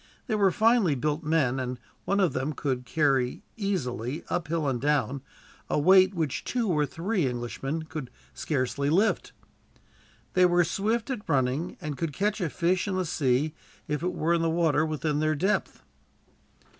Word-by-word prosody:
They -, -, -2 dB
were 200 Hz, -2 st, +4 dB
finely 220 Hz, -, +3 dB
built 150 Hz, +4 st, -1 dB
men, 150 Hz, -5 st, +1 dB
and 125 Hz, -1 st, -3 dB, 0.3 s
one 200 Hz, -, +1 dB
of 180 Hz, -8 st, +2 dB
them 135 Hz, +4 st, -2 dB
could 130 Hz, -3 st, -3 dB
carry 135 Hz, -3 st, +1 dB
easily, 155 Hz, -, -2 dB
uphill 165 Hz, -3 st, -1 dB
and 125 Hz, -3 st, -1 dB
down, 140 Hz, -2 st, +1 dB, 0.5 s
a -, -, +1 dB
weight 185 Hz, +5 st, +5 dB
which 155 Hz, -6 st, -2 dB
two 240 Hz, -3 st, -1 dB
or 150 Hz, -4 st, +2 dB
three 175 Hz, -1 st, -1 dB
Englishmen 130 Hz, +5 st, -3 dB
could 155 Hz, -5 st, -6 dB, 0.2 s
scarcely 140 Hz, 0 st, -1 dB
lift. 195 Hz, +8 st, +2 dB, 1.0 s
They 180 Hz, 0 st, +5 dB
were 175 Hz, 0 st, +4 dB
swift 220 Hz, +8 st, -1 dB
at 230 Hz, -5 st, -5 dB
running, 135 Hz, +5 st, 0 dB
and 150 Hz, -3 st, -5 dB
could 165 Hz, -3 st, -2 dB
catch 210 Hz, +4 st, -1 dB
a 170 Hz, -, 0 dB
fish 180 Hz, +5 st, 0 dB
in 190 Hz, -, -1 dB
the 185 Hz, -1 st, 0 dB
sea, 145 Hz, -1 st, +1 dB, 0.3 s
if 150 Hz, 0 st, -2 dB
it 180 Hz, +1 st, -1 dB
were 165 Hz, +2 st, +1 dB
in 170 Hz, -, +2 dB
water 160 Hz, -2 st, +2 dB
within 155 Hz, -1 st, -1 dB
their 155 Hz, 0 st, +1 dB
depth. 190 Hz, +8 st, -1 dB
155 Hz, 165 wpm, -27 LUFS, 140-185 Hz, 1.0 s, weight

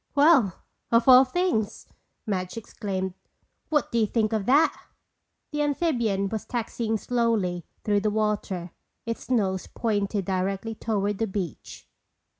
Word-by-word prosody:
"Well, 285 Hz, -, +4 dB, 0.3 s
of 230 Hz, +1 st, +4 dB
all 260 Hz, 0 st, +9 dB
things!" 265 Hz, -, -1 dB, 0.4 s
Madge 185 Hz, 0 st, -3 dB
exclaimed. 190 Hz, -4 st, -4 dB, 0.6 s
"What 300 Hz, -4 st, +1 dB
do 235 Hz, -, +1 dB
you 220 Hz, -, +3 dB
think 220 Hz, 0 st, 0 dB
of 210 Hz, -3 st, -1 dB
that!" 285 Hz, +5 st, +4 dB, 0.8 s
The 295 Hz, 0 st, -1 dB
amphibian 245 Hz, -, +1 dB
was 220 Hz, 0 st, -3 dB
taxiing 230 Hz, -1 st, -2 dB
slowly 215 Hz, -8 st, 0 dB, 0.2 s
through 205 Hz, -1 st, +2 dB
the 210 Hz, +1 st, 0 dB
water, 205 Hz, -5 st, -1 dB, 0.3 s
its 230 Hz, +1 st, -5 dB
nose 195 Hz, -7 st, 0 dB
pointed 205 Hz, -3 st, -1 dB
directly 195 Hz, +4 st, -1 dB
toward 205 Hz, -2 st, -1 dB
the 225 Hz, -, +1 dB
beach. 190 Hz, -5 st, -6 dB
215 Hz, 130 wpm, -26 LUFS, 195-235 Hz, 0.8 s, all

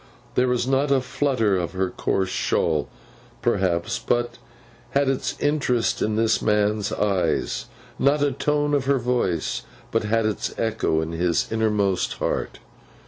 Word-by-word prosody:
There 125 Hz, +1 st, +2 dB
was 125 Hz, -1 st, +1 dB
not 135 Hz, +2 st, +1 dB
a 140 Hz, -1 st, +4 dB
flutter 125 Hz, -5 st, +1 dB
of 85 Hz, 0 st, -3 dB
her 95 Hz, 0 st, -1 dB
coarse 95 Hz, -1 st, -1 dB
shawl, 80 Hz, -3 st, 0 dB, 0.5 s
perhaps, 90 Hz, -3 st, +1 dB
but 120 Hz, 0 st, -1 dB, 0.6 s
had 140 Hz, -1 st, +2 dB
its 135 Hz, -1 st, -1 dB
interest 125 Hz, -6 st, +1 dB
in 105 Hz, 0 st, +1 dB
this 110 Hz, 0 st, +2 dB
man's 105 Hz, -1 st, +1 dB
eyes; 100 Hz, -3 st, 0 dB, 0.3 s
not 140 Hz, +2 st, +3 dB
a 145 Hz, -, +2 dB
tone 145 Hz, +2 st, 0 dB
of 140 Hz, -2 st, +1 dB
her 140 Hz, 0 st, +3 dB
voice 120 Hz, -9 st, -1 dB, 0.3 s
but 115 Hz, -1 st, +1 dB
had 110 Hz, +1 st, +1 dB
its 110 Hz, -1 st, -2 dB
echo 110 Hz, -8 st, 0 dB
in 80 Hz, +1 st, -4 dB
his 85 Hz, 0 st, 0 dB
innermost 105 Hz, -4 st, +1 dB
heart. -, -, -2 dB
110 Hz, 145 wpm, -24 LUFS, 95-130 Hz, 0.6 s, a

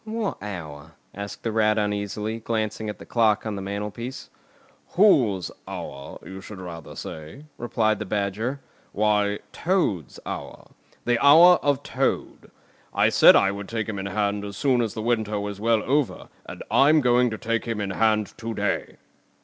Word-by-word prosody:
"What 220 Hz, -, -3 dB
hour?" 80 Hz, -8 st, -7 dB, 0.2 s
asked 100 Hz, +1 st, -7 dB
the 115 Hz, -, -1 dB
Rat 110 Hz, -1 st, +2 dB
uneasily, 105 Hz, +1 st, -2 dB
glancing 110 Hz, -1 st, -2 dB
at 105 Hz, -, -6 dB
the -, -, -12 dB
clock 110 Hz, -3 st, +2 dB
on 110 Hz, -2 st, -3 dB
the 100 Hz, -, -5 dB
mantelpiece. 105 Hz, +5 st, -5 dB, 0.6 s
"Whose 120 Hz, -, +4 dB, 0.2 s
hour, 70 Hz, 0 st, -7 dB
you 95 Hz, 0 st, -8 dB
should 100 Hz, 0 st, -10 dB
rather 85 Hz, -3 st, -8 dB
say," 80 Hz, -, -8 dB
replied 110 Hz, -2 st, 0 dB
the 110 Hz, -, -4 dB
Badger. 105 Hz, +7 st, -2 dB, 0.3 s
"Why, 105 Hz, -1 st, +2 dB
Toad's 160 Hz, -, -1 dB
hour! -, -, -7 dB, 0.3 s
The 120 Hz, +1 st, +1 dB
hour 165 Hz, +5 st, +8 dB
of 145 Hz, -1 st, +1 dB
Toad! -, -, -2 dB, 0.5 s
I -, -, +4 dB
said -, -, +7 dB
I 95 Hz, -, +4 dB
would 100 Hz, 0 st, -7 dB
take 110 Hz, -3 st, -2 dB
him 105 Hz, -2 st, -4 dB
in 95 Hz, -, -4 dB
hand 100 Hz, 0 st, -1 dB
as 100 Hz, -1 st, -7 dB
soon 130 Hz, -1 st, +2 dB
as 115 Hz, -3 st, -2 dB
the 110 Hz, -, -4 dB
winter 110 Hz, -3 st, 0 dB
was 100 Hz, 0 st, -5 dB
well 115 Hz, -1 st, +2 dB
over, 140 Hz, 0 st, -1 dB, 0.2 s
and -, -, -8 dB
I'm 150 Hz, +3 st, +5 dB
going 125 Hz, -1 st, +3 dB
to 110 Hz, -, -5 dB
take 115 Hz, +1 st, -2 dB
him 115 Hz, -2 st, -3 dB
in 100 Hz, -2 st, -2 dB
hand 110 Hz, +1 st, +1 dB
to 115 Hz, -1 st, -4 dB
day!" -, -, -2 dB
110 Hz, 170 wpm, -24 LUFS, 100-120 Hz, 0.6 s, hour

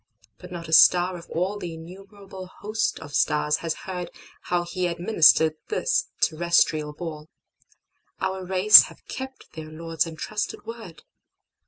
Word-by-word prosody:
But 180 Hz, 0 st, -13 dB
not 170 Hz, -2 st, -7 dB
a 160 Hz, -, -5 dB
star 180 Hz, +2 st, +5 dB
of 170 Hz, -1 st, -11 dB
allThe 180 Hz, -1 st, -4 dB
innumerable 190 Hz, +3 st, -12 dB
host 215 Hz, +4 st, -3 dB
of 145 Hz, -2 st, -11 dB
stars 150 Hz, 0 st, +1 dB
has 165 Hz, -1 st, -4 dB
heardHow 175 Hz, -1 st, -6 dB
He 180 Hz, 0 st, -2 dB
administered 170 Hz, -3 st, +3 dB
this -, -, -1 dB, 0.2 s
terrestrial 155 Hz, -2 st, +1 dB
ball. 155 Hz, -1 st, -8 dB, 0.9 s
Our 190 Hz, 0 st, -3 dB
race 190 Hz, +3 st, +8 dB
have -, -, -16 dB
kept 265 Hz, 0 st, -9 dB
their 155 Hz, -1 st, -9 dB
Lord's 165 Hz, 0 st, -3 dB
entrusted 205 Hz, +7 st, -5 dB
Word. 220 Hz, -9 st, -10 dB
175 Hz, 130 wpm, -24 LUFS, 160-190 Hz, 0.9 s, race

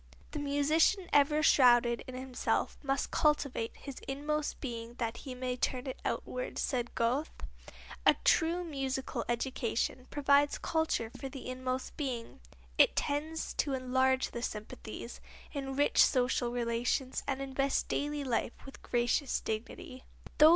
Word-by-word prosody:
"The 300 Hz, -, -4 dB
musician 300 Hz, +6 st, +2 dB
ever 295 Hz, +2 st, +4 dB
shrouded 240 Hz, -4 st, +5 dB
in 255 Hz, -, -7 dB
himself 255 Hz, -1 st, -1 dB
must 275 Hz, -1 st, -1 dB
cultivate 280 Hz, -6 st, +1 dB
his 275 Hz, -2 st, -8 dB
inmost 295 Hz, +2 st, -2 dB
being 235 Hz, -3 st, -5 dB
that 235 Hz, -1 st, -3 dB
he 260 Hz, -2 st, -7 dB
may 250 Hz, 0 st, -2 dB
turn 250 Hz, +1 st, -1 dB
it 260 Hz, -, -5 dB
outward," -, -, -3 dB
said 240 Hz, -3 st, -1 dB
Goethe. 250 Hz, +7 st, +1 dB, 0.7 s
A -, -, +6 dB
true 340 Hz, +2 st, +3 dB
musical 270 Hz, -5 st, -3 dB
education 250 Hz, 0 st, -1 dB
provides 285 Hz, 0 st, +3 dB
culture 320 Hz, -8 st, 0 dB
for 270 Hz, -, -6 dB
the 265 Hz, -1 st, -8 dB
inmost 255 Hz, 0 st, -3 dB
being. 255 Hz, -6 st, -4 dB, 0.4 s
It -, -, +6 dB
tends 310 Hz, +3 st, -2 dB
to 280 Hz, -, +1 dB
enlarge 260 Hz, 0 st, +1 dB
the 235 Hz, -, -5 dB
sympathies, 220 Hz, +1 st, -6 dB, 0.3 s
enrich 275 Hz, 0 st, +3 dB
social 250 Hz, -1 st, +2 dB
relations 240 Hz, +2 st, -1 dB
and 270 Hz, -1 st, -1 dB
invest 275 Hz, 0 st, 0 dB
daily 290 Hz, 0 st, -1 dB
life 240 Hz, -2 st, 0 dB
with 270 Hz, -, -11 dB
gracious 245 Hz, +3 st, +1 dB
dignity. 235 Hz, +3 st, -5 dB
265 Hz, 130 wpm, -32 LUFS, 245-285 Hz, 0.7 s, A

